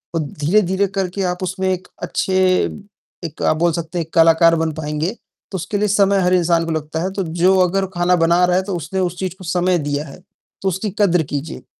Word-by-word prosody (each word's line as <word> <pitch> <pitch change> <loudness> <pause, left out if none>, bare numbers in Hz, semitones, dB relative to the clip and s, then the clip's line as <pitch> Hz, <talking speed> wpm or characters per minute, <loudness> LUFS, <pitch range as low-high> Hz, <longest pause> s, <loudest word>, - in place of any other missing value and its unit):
औ - - +1
धीरे-धीरे 185 +7 +1
करके 190 0 -2
आप 180 +1 -6
उसमें 190 +1 -2
एक 185 0 -3 0.2
अच्छे 185 +2 -1 0.9
एक 160 - -8
आप 155 - +2
बोल 170 +1 +2
सकते 170 +1 -4
हैं, 165 - -2
एक 160 - -32
कलाकार 165 0 +5
बन 160 -1 0
पाएँगे, 155 +3 -3 0.4
तो - - -5
उसके 180 +4 -3
लिए 210 +1 +1
समय 200 -1 +3
हर 180 0 +2
इंसान 170 -2 +2
को 165 - -3
लगता 155 +1 -3
है। 190 - -2
तो 195 - -2
जो 175 +3 +2
अगर 190 +2 +2
ख़ाना 175 +1 +3
बना 170 +1 +3
रहा 180 0 +2
है, 190 - +1
तो 190 -2 -4
उसने 170 +3 -4
उस 180 -1 -1
चीज़ 185 -1 -3
को 185 - -12
समय 180 +1 +1
दिया 145 +1 -2
है, 140 - -12 0.4
तो 195 - -2
उसकी 190 +4 -3
कद्र 180 -5 +3
कीजिए। 150 +3 -5
175 Hz, 225 wpm, -19 LUFS, 165-190 Hz, 0.9 s, कलाकार